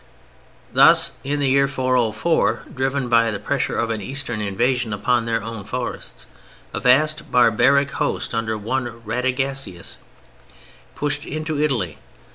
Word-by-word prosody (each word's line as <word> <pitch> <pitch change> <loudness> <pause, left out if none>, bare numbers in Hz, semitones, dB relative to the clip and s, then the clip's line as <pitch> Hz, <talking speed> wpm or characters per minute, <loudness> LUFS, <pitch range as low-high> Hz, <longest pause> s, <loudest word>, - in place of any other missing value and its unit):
] - - -30
Thus - - +6
in 145 +2 -1
the 140 - +1
year 140 +1 +4
404, 130 +2 +1
driven 135 0 -1
by 115 -1 +3
the 105 - -3
pressure - - -2
of 115 -1 0
an 110 -2 -3
Eastern 125 -1 -3
invasion 115 +3 0
upon 120 +3 +1
their 115 -2 -1
own 115 -2 -6
forests, 105 - -6 0.5
a - - -2
vast 150 +4 +2
barbaric 135 +4 +4
host - - -2
under 110 -1 -1
one 115 +1 -4
Radagasius 130 -4 -2 1.0
pushed 145 0 -2
into 155 0 -3
Italy. 115 - -1
125 Hz, 135 wpm, -21 LUFS, 115-140 Hz, 1.0 s, Thus